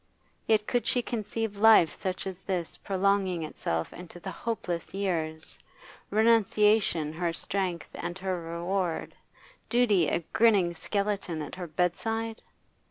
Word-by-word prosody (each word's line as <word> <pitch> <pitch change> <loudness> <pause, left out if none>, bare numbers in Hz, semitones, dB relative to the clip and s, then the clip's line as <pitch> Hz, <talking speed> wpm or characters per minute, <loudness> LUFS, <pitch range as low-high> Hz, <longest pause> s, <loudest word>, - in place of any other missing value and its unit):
Yet 215 -1 +3
could 245 +1 0
she 245 - +2
conceive 220 -2 -3
life 215 -6 +7
such 185 -1 -3
as 190 -1 -5
this 180 -4 -3
prolonging 190 -3 +1
itself 80 - -3
into 175 0 -10
the 190 +2 -6
hopeless 180 -4 -4
years, 160 -5 -2 0.5
renunciation 210 -6 +3
her 170 +1 -1
strength 180 0 -3
and 175 - -5
her 185 -2 -2
reward, 170 +1 -2 0.6
duty 215 -9 +4
a 170 - 0
grinning 200 -7 +4
skeleton 200 -2 -2
at 145 - -8
her 180 -2 -5
bedside? 225 +8 -1
190 Hz, 125 wpm, -28 LUFS, 170-210 Hz, 0.6 s, life